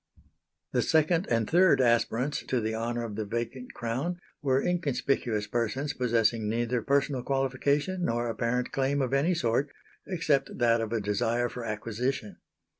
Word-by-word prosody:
The 125 - +2
second 160 +6 +2
and 115 -2 +1
third 180 -1 +5
aspirants 125 +2 +2
to 130 - +1
the 110 0 -2
honour 120 +1 -2
of 110 -3 -5
the 110 - -2
vacant 115 +4 -5
crown 130 +10 -2 0.2
were 135 -3 +2
inconspicuous 135 -9 0
persons 120 +6 -1
possessing 115 -3 +1
neither 120 +2 0
personal 140 -1 +1
qualification 140 +7 0
nor 120 -2 0
apparent 120 +2 -1
claim 140 +1 0
of 130 0 -2
any 155 +6 +2
sort 130 0 +1 0.4
except 150 -7 0
that 115 -1 +3
of 115 -1 -3
a 115 -2 0
desire 115 +4 0
for 125 - -7
acquisition. 110 +1 -3
125 Hz, 150 wpm, -28 LUFS, 115-140 Hz, 0.4 s, third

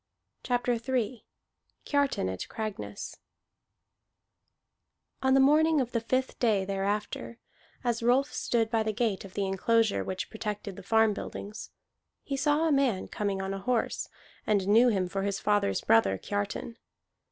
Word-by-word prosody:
CHAPTER 245 0 0
III 250 -2 -2 0.6
KIARTAN 285 - +1
AT 95 0 -5
CRAGNESS 215 -2 -5 2.0
On 265 0 +4
the - - +6
morning 305 +3 +5
of 250 -2 -1
the 230 - 0
fifth 255 +3 -1
day 210 -5 +2
thereafter, 200 +4 -2 0.5
as 235 -2 0
Rolf 255 +5 +2
stood 225 -2 0
by 225 -2 +2
the 215 0 -1
gate 215 -3 0
of 190 - -13
the 200 - 0
enclosure 220 +3 +2
which 185 +1 -4
protected 210 -3 -5
the 200 - -9
farm 220 +2 +3
buildings, 205 +1 -7 0.5
he 275 - -3
saw 295 +4 +2
a - - +2
man 265 -9 +1
coming 200 -2 -2
on 190 0 -3
a 195 - -4
horse, 240 +3 -1 0.4
and 200 -3 +2
knew 225 +5 +6
him 195 -6 +1
for 195 +2 -3
his 200 0 -1
father's 205 - +1
brother 100 -4 +3
Kiartan. 205 - -4
220 Hz, 150 wpm, -29 LUFS, 195-250 Hz, 2.0 s, the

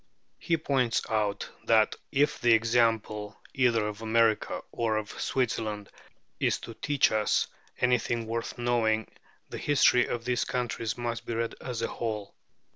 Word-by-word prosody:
He 165 -2 +1
points 135 -6 +1
out 105 -2 0 0.2
that 110 -2 +4 0.2
if 145 +2 +1
the 120 -1 +5
"example 115 -2 +1
either 115 -5 +2
of 105 +1 -6
America 115 -1 +1
or 115 -2 0
of 105 -1 -5
Switzerland 110 -5 -1 0.5
is - - +2
to 115 - -8
teach 145 +3 +2
us 110 -1 +2 0.3
anything 120 -2 +1
worth 115 +1 -4
knowing, 115 -2 +1 0.4
the - - -6
history 135 -3 +4
of 120 -1 -4
these 125 -1 +1
countries 115 -2 -2
must 120 -1 -4
be 115 - -2
read 115 0 -1
as 120 -3 -4
a - - +1
whole. 110 -3 -4
115 Hz, 145 wpm, -28 LUFS, 110-120 Hz, 0.5 s, the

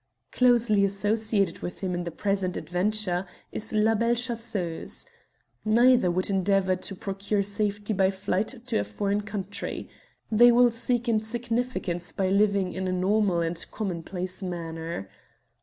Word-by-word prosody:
Closely 235 -5 +4
associated 205 +1 +1
with 175 - -6
him 185 -2 -1
in 175 0 -2
the - - -2
present 190 +1 -1
adventure 185 0 -1 0.2
is 220 +1 -5
La 215 +1 +3
Belle 230 +2 +2
Chasseuse. 230 -8 -3 0.6
Neither 240 -1 +5
would 185 +2 +1
endeavour 195 -1 +2
to 195 +2 -4
procure 200 +2 -1
safety 205 +1 -1
by 190 -1 +3
flight 200 +5 -2
to - - 0
a - - +1
foreign 200 - -1
country. 205 -1 -5 0.4
They 240 +3 +7
will 240 0 +5
seek 240 +1 -1
insignificance 225 -5 -1
by 190 -1 0
living 200 -1 +2
in 190 0 -3
a - - 0
normal 185 -1 +2
and 165 0 -1
commonplace 185 -2 -4
manner. 165 - -5
200 Hz, 140 wpm, -27 LUFS, 185-220 Hz, 0.6 s, They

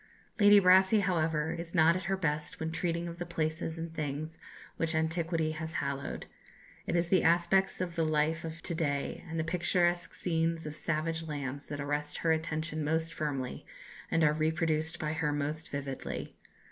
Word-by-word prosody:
Lady 205 0 +8
Brassey, 190 +3 +6
however, 160 -4 +1
is 170 0 -5
not 165 0 +6
at 185 +1 -3
her 195 +1 0
best 150 -4 -1
when 160 0 -2
treating 170 0 -1
of 170 0 -7
the - - -1
places 160 0 -2
and 165 0 -5
things 155 +1 -4 0.4
which 165 0 0
antiquity 160 0 0
has 160 +1 -5
hallowed: 140 0 -3 0.6
it - - 0
is 170 0 +1
the 185 -1 +4
aspects 175 +3 +3
of 175 -2 -2
the 165 - +1
life 155 +1 +1
of 165 0 -7
to - - -2
day 145 -4 -2
and 165 0 -3
the - - +1
picturesque 175 0 +1
scenes 165 -1 0
of 150 0 -5
savage 165 +1 -1
lands 140 -2 -4
that 145 - -5
arrest 145 +1 -2
her 165 - +1
attention 160 0 -1
most 160 +2 0
firmly, 135 -5 -3 0.5
and 165 - +2
are 150 -1 +5
reproduced 160 +1 0
by 155 -2 -2
her 155 -2 0
most 150 +2 -2
vividly. 140 -1 -5
160 Hz, 175 wpm, -31 LUFS, 155-170 Hz, 0.6 s, Lady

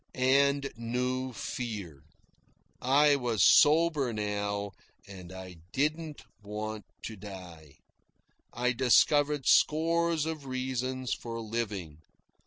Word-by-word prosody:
And 140 +2 +3
I - - -3
knew 125 +2 -2
fear. 105 - -6 0.8
I 145 +3 +4
was 120 -5 0
sober 150 -4 +5
now, 105 -1 -3 0.4
and 95 -3 -11
I 95 -1 -9 0.2
didn't 155 0 -2 0.2
want 105 +1 -6 0.2
to 110 - -6
die. 90 -7 -11 0.8
I 125 +1 0
discovered 145 +3 +3
scores 165 0 +3
of 155 -4 -5
reasons 130 0 -2
for 115 -1 -6
living. 105 -9 -4
125 Hz, 100 wpm, -29 LUFS, 105-140 Hz, 0.8 s, sober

